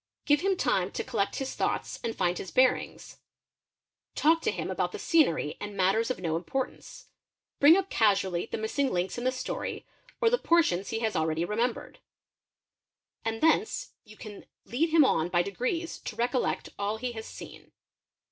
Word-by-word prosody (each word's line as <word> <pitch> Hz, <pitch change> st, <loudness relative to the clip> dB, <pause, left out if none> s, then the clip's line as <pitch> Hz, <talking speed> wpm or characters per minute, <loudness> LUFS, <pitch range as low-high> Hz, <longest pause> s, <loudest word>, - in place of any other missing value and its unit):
Give 290 Hz, 0 st, +3 dB
him 385 Hz, 0 st, +1 dB
time 195 Hz, -, +1 dB
to -, -, -2 dB
collect 200 Hz, -6 st, -1 dB
his 270 Hz, -1 st, -3 dB
thoughts -, -, -2 dB
d 230 Hz, -, -3 dB
find 175 Hz, -5 st, -1 dB
his 190 Hz, -, -6 dB
bearings; 255 Hz, +5 st, +1 dB, 1.0 s
talk 325 Hz, +2 st, +3 dB
to 445 Hz, -, 0 dB
him -, -, -3 dB
about -, -, -1 dB
the -, -, -4 dB
scenery 215 Hz, -, +2 dB
and 205 Hz, -1 st, -7 dB
matters 195 Hz, +5 st, +2 dB
of 255 Hz, -, -2 dB
no 165 Hz, -2 st, -1 dB
nportance; 265 Hz, +8 st, -5 dB, 0.5 s
bring 305 Hz, +5 st, +8 dB
up 390 Hz, 0 st, -2 dB
casually 195 Hz, -4 st, +2 dB
the -, -, -2 dB
missing 255 Hz, +5 st, -1 dB
links 180 Hz, +5 st, -1 dB
in 240 Hz, -, -5 dB
the 255 Hz, -, +3 dB
story, 255 Hz, -, -4 dB, 0.3 s
or 455 Hz, -, +3 dB
the -, -, +3 dB
mrtions 200 Hz, -, +2 dB
he 225 Hz, -, -2 dB
has 220 Hz, -3 st, -1 dB
already 160 Hz, +1 st, 0 dB
remembered; 230 Hz, +5 st, -2 dB, 1.2 s
and 225 Hz, 0 st, -3 dB
thence 415 Hz, +9 st, +2 dB
you 215 Hz, 0 st, -16 dB
can 210 Hz, -2 st, -10 dB, 0.2 s
lead 265 Hz, -, 0 dB
him 315 Hz, -2 st, +6 dB
on 165 Hz, -9 st, +1 dB
by 175 Hz, -1 st, +3 dB
ep 200 Hz, +4 st, -7 dB
'ees 330 Hz, +6 st, -2 dB
to 220 Hz, -, -7 dB
recollect 245 Hz, +2 st, -1 dB
all 205 Hz, +2 st, -1 dB
he 250 Hz, +2 st, -3 dB
has 220 Hz, -1 st, -7 dB
seen. -, -, -11 dB
225 Hz, 175 wpm, -28 LUFS, 190-285 Hz, 1.2 s, bring